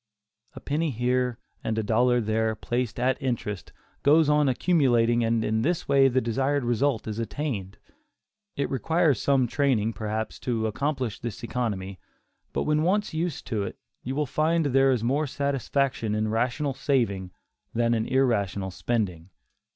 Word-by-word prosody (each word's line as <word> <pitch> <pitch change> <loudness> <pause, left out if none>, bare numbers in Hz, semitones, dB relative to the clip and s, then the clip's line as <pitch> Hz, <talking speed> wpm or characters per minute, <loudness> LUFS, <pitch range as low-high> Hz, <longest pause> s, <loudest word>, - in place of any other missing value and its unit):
A - - -7
penny 155 +3 -1
here, 125 0 0 0.3
and 110 - -2
a 110 - 0
dollar 120 +3 +3
there, 110 0 0
placed 120 +1 -2
at 130 +3 +1
interest, 115 -6 -3 0.3
goes 150 +1 +5
on 150 -2 +4
accumulating, 120 -6 +3
and 115 0 +1
in 110 +1 +1
this 170 +6 -1
way 135 -1 +5
the 130 0 +2
desired 135 +4 0
result 120 0 0
is 110 +1 -4
attained. 115 -6 -4 0.8
It 140 - -1
requires 160 +1 +2
some 135 -2 +3
training, 120 -4 +1
perhaps, 110 0 -4
to 115 -3 -1
accomplish 130 0 -2
this 120 0 -6
economy, 100 -6 -3 0.5
but - - -1
when 150 0 +1
once 200 +4 +1
used 165 -1 -2
to 110 -4 -1
it, 100 - -5 0.2
you 130 +2 -4
will 150 +1 +1
find 160 +4 +1
there 135 0 +4
is 125 -4 +1
more 140 +5 +1
satisfaction 135 -4 -1
in 110 0 0
rational 125 +6 0
saving, 115 -9 0 0.5
than 115 0 +2
in 110 -1 0
irrational 100 -8 +1
spending. 95 -6 -2
125 Hz, 155 wpm, -26 LUFS, 110-140 Hz, 0.8 s, goes